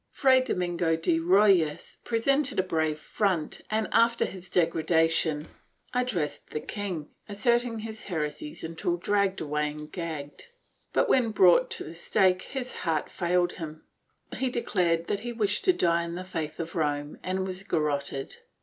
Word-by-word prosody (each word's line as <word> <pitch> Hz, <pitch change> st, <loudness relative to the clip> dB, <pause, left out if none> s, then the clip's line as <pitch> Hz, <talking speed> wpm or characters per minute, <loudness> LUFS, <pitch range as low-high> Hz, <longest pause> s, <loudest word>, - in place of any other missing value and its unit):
Fray 260 Hz, -2 st, +4 dB
Domingo 175 Hz, -8 st, 0 dB
de 165 Hz, 0 st, +1 dB
Rojas 180 Hz, -3 st, +3 dB
pre 230 Hz, -, -1 dB
sented 275 Hz, +3 st, +1 dB
a 185 Hz, -, +3 dB
brave 160 Hz, -4 st, 0 dB
front 180 Hz, -1 st, -1 dB
and, 215 Hz, 0 st, 0 dB
after 230 Hz, +1 st, +4 dB
his 185 Hz, -1 st, -8 dB
degradation, 165 Hz, -2 st, +2 dB, 0.5 s
addressed 245 Hz, -12 st, -1 dB
the -, -, -3 dB
king, 180 Hz, -5 st, -5 dB, 0.2 s
asserting 235 Hz, +2 st, +1 dB
his 220 Hz, 0 st, -7 dB
heresies 175 Hz, -, -4 dB
until 165 Hz, +2 st, -2 dB
dragged 200 Hz, +1 st, +1 dB
away 150 Hz, -1 st, -1 dB
and 150 Hz, 0 st, -9 dB
gagged, 160 Hz, -, -6 dB, 0.4 s
but -, -, +2 dB
when 245 Hz, -3 st, +3 dB
brought 185 Hz, -5 st, +5 dB
to -, -, -4 dB
the 155 Hz, -, -8 dB
stake 185 Hz, +2 st, +2 dB
his 260 Hz, -2 st, -5 dB
heart 160 Hz, -3 st, -1 dB
failed 175 Hz, 0 st, +1 dB
him; 155 Hz, -2 st, -8 dB, 0.5 s
he 260 Hz, -, 0 dB
declared 180 Hz, -9 st, 0 dB
that 200 Hz, -, -1 dB
he 240 Hz, +2 st, -5 dB
wished 210 Hz, -3 st, 0 dB
to 375 Hz, -, +7 dB
die 170 Hz, -, +2 dB
in 170 Hz, 0 st, -5 dB
the 180 Hz, -, -5 dB
faith 160 Hz, -4 st, -5 dB
of 165 Hz, 0 st, -5 dB
Rome 145 Hz, -2 st, -1 dB
and 190 Hz, +1 st, -2 dB
was 185 Hz, 0 st, -4 dB
garroted. 145 Hz, -6 st, -2 dB
175 Hz, 160 wpm, -28 LUFS, 160-210 Hz, 0.5 s, to